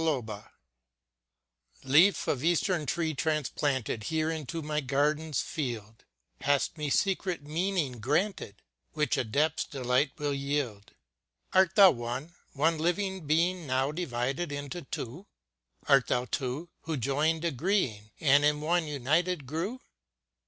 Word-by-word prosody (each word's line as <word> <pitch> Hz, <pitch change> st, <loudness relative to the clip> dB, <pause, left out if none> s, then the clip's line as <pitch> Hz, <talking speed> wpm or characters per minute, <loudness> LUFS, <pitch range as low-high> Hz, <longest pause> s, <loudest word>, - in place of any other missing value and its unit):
223 60 Hz, -, -8 dB
Leaf 175 Hz, +8 st, +5 dB
of 135 Hz, -1 st, 0 dB
Eastern 170 Hz, -1 st, +1 dB
tree 165 Hz, -2 st, 0 dB
transplanted 140 Hz, -6 st, -1 dB
Here 160 Hz, +2 st, 0 dB
into 160 Hz, +1 st, -4 dB
my 150 Hz, 0 st, -1 dB
garden's 150 Hz, +2 st, 0 dB
field, 115 Hz, -7 st, -5 dB, 0.3 s
Hast 145 Hz, +2 st, +1 dB
me 150 Hz, -2 st, -3 dB
secret 185 Hz, 0 st, 0 dB
meaning 155 Hz, -4 st, -1 dB
granted, 145 Hz, -, -1 dB, 0.3 s
Which 150 Hz, -4 st, +1 dB
adepts 145 Hz, +7 st, +1 dB
delight 130 Hz, +1 st, 0 dB
will 145 Hz, -2 st, -1 dB
yield. 140 Hz, -7 st, -3 dB, 0.6 s
Art 190 Hz, -1 st, +4 dB
thou 195 Hz, -3 st, +9 dB
one 125 Hz, +6 st, -5 dB
— -, -, -35 dB
one 155 Hz, +3 st, +1 dB
living 185 Hz, 0 st, -1 dB
being 170 Hz, +2 st, +1 dB
Now 130 Hz, +2 st, +1 dB
divided 145 Hz, 0 st, -2 dB
into 145 Hz, +4 st, -5 dB
two? 140 Hz, -, -6 dB, 0.6 s
Art 135 Hz, -3 st, +5 dB
thou 125 Hz, 0 st, +1 dB
two, 135 Hz, +6 st, -3 dB
who 160 Hz, -2 st, -2 dB
joined 150 Hz, +6 st, 0 dB
agreeing 135 Hz, -, 0 dB
And 145 Hz, -1 st, +5 dB
in 150 Hz, 0 st, +3 dB
one 165 Hz, +2 st, +1 dB
united 150 Hz, +4 st, 0 dB
grew? 175 Hz, -, -3 dB
150 Hz, 125 wpm, -29 LUFS, 125-165 Hz, 0.6 s, thou